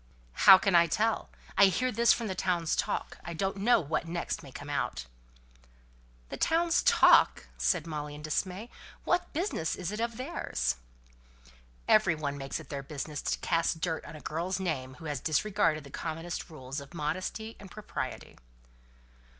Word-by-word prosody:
"How 190 - +9
can 195 0 0
I 170 -1 +6
tell? 225 +5 0 0.3
I 200 - +7
hear 255 +7 +1
of 235 - -6
this 235 +1 +5
from 230 - +1
the 195 - -2
town's 175 -3 0
talk. - - -2
I 170 - -6
don't 195 +3 -1
know 225 +4 +4
what 165 0 -2
next 170 +1 -3
may - - -12
come - - -9
out!" - - -2 1.2
"The - - -5
town's 335 +1 +2
talk!" - - +5
said - - +1
Molly 150 -2 -5
in 150 - -10
dismay. 185 +8 -2 0.3
"What 350 0 0
business 315 - -1
is 180 0 -4
it 210 - -4
of 230 -1 -2
theirs?" 65 - -2 1.1
"Every 205 -6 +5
one 145 -2 -3
makes 135 -1 -4
it - - -12
their 140 -2 -4
business 145 +1 -5
to - - -1
cast 165 -1 +1
dirt 160 -1 -2
on - - -10
a 150 - -10
girl's 180 +4 -2
name 130 -8 -3
who 160 - -12
has 145 -3 -2
disregarded 165 0 +1
the 140 - -13
commonest 165 +4 -5
rules 135 -3 -6
of 140 +5 -12
modesty 185 +8 -3
and 200 - -11
propriety." 215 +2 -6
170 Hz, 175 wpm, -30 LUFS, 150-205 Hz, 1.2 s, How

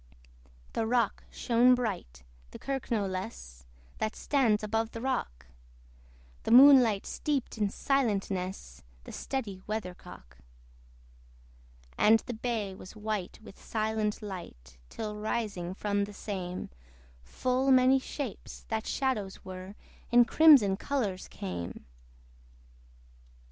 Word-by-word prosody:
The 225 - -1
rock 235 -2 0
shone 245 +1 +4
bright, 185 - -4 0.3
the - - -10
kirk 270 -2 -4
no 215 -4 +1
less, 185 - -6 0.3
That 215 - -2
stands 235 -7 +1
above 225 +1 -1
the 230 - -5
rock: 145 - -3 1.0
The - - -5
moonlight 245 -4 +7
steeped 275 -6 -3
in 205 -1 +2
silentness 195 - -2 0.2
The - - -10
steady 215 -9 -4
weathercock. 180 - -7 1.6
And 220 +1 +6
the 245 - -6
bay 220 -4 -3
was 185 +1 -12
white 210 -3 -4
with 200 - -14
silent 215 -1 -1
light, 60 - -9
Till 210 - -5
rising 210 -5 -3
from 205 0 0
the 205 - -11
same, 185 - -5 0.5
Full 255 - -1
many 260 0 +6
shapes, 265 -3 -7
that 220 0 -2
shadows 220 -8 -2
were, 185 +1 -8 0.4
In 240 0 +7
crimson 255 -10 +6
colours 210 -8 -2
came. 90 -3 -6
215 Hz, 110 wpm, -30 LUFS, 185-245 Hz, 1.6 s, moonlight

